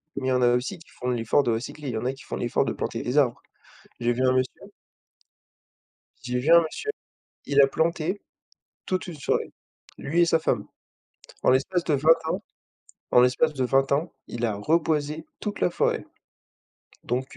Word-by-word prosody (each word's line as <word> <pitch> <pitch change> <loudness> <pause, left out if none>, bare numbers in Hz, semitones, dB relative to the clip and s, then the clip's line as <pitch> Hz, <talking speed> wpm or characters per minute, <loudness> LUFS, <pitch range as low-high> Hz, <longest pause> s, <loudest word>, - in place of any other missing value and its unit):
mais 130 -1 -3
il - - +2
y - - +2
en 125 - +2
a 120 0 +5
aussi 135 +10 -2
qui 160 - -18
font 125 - -5
l'effort 120 +3 +2
de 120 - +1
recycler. 135 +6 -4
ll - - -3
y 110 - -2
en 120 - -3
a 130 - 0
qui 135 - -14
font - - -5
l'effort - - 0
de - - -1
planter - - -3
des 125 +4 -2
arbres. 130 -5 +3 0.6
J'ai 120 0 +1
vu 125 - -3
un 130 - +4
monsieur 130 0 -1 1.6
j'ai 125 0 -2
vu 145 +6 0
un 170 - +8
monsieur, 165 - -4 0.6
il 140 0 +4
a 135 - +7
planté 170 +6 -1 0.7
toute 185 0 -2
une 175 - -6
forêt, - - -1 0.5
lui 165 +5 0
et 170 - +6
sa 165 -1 +3
femme. - - 0 0.8
En - - +4
l'espace 145 +7 +2
de 155 - +1
20 155 +4 +5
ans, - - -2 0.7
en 125 - +7
l'espace 130 +5 +3
de 135 -3 -1
20 135 +2 +2
ans, 155 +4 0
il 120 0 -2
a 110 -3 -1
reboisé 150 +5 0
toute 210 -1 -4
la - - +3
forêt. - - 0 1.0
Donc 130 +2 -3
135 Hz, 195 wpm, -25 LUFS, 125-160 Hz, 1.6 s, un